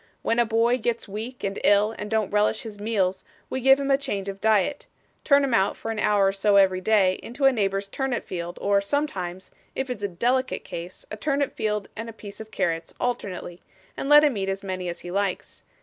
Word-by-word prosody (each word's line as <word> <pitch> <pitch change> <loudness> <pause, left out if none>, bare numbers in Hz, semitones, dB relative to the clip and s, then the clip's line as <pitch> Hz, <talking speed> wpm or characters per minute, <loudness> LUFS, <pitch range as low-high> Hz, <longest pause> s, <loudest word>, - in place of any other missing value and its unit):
'When 230 - +1
a 240 - +4
boy 230 +2 +2
gets 235 0 -2
weak 220 +5 -7
and 195 0 -2
ill 205 +2 +4
and 210 - -6
don't 220 -3 0
relish 210 +1 +2
his 215 -3 -8
meals, 195 -4 0 0.3
we 260 - -2
give 270 +2 +6
him 280 0 0
a 275 - +4
change 205 -9 -3
of 195 0 -7
diet 220 +6 +2 0.4
turn 280 -1 +5
him 270 -3 0
out, 195 -3 +2
for 225 - -4
an 220 - -3
hour 205 -2 +3
or - - +1
so 200 +1 +2
every 190 -2 +4
day, 190 -2 +3
into 270 +4 -3
a 270 - +7
neighbour's 200 -4 0
turnip 260 +3 -2
field, 175 0 -5
or 200 0 +2
sometimes, 190 -7 -3 0.2
if 265 -1 -2
it's 245 - -5
a 200 - 0
delicate 245 +8 0
case, 170 +2 -8
a 215 - -5
turnip 280 +4 0
field 210 -2 -1
and 225 +1 -5
a - - -8
piece 205 -2 -11
of 220 - -10
carrots 165 -5 -2
alternately, 185 -7 -3 0.3
and 275 - -4
let 295 0 +8
him 285 -7 +2
eat 195 -1 -1
as 195 +1 -3
many 185 -2 -3
as 170 - -6
he 175 - -7
likes. 195 0 -2
210 Hz, 225 wpm, -25 LUFS, 195-245 Hz, 0.4 s, let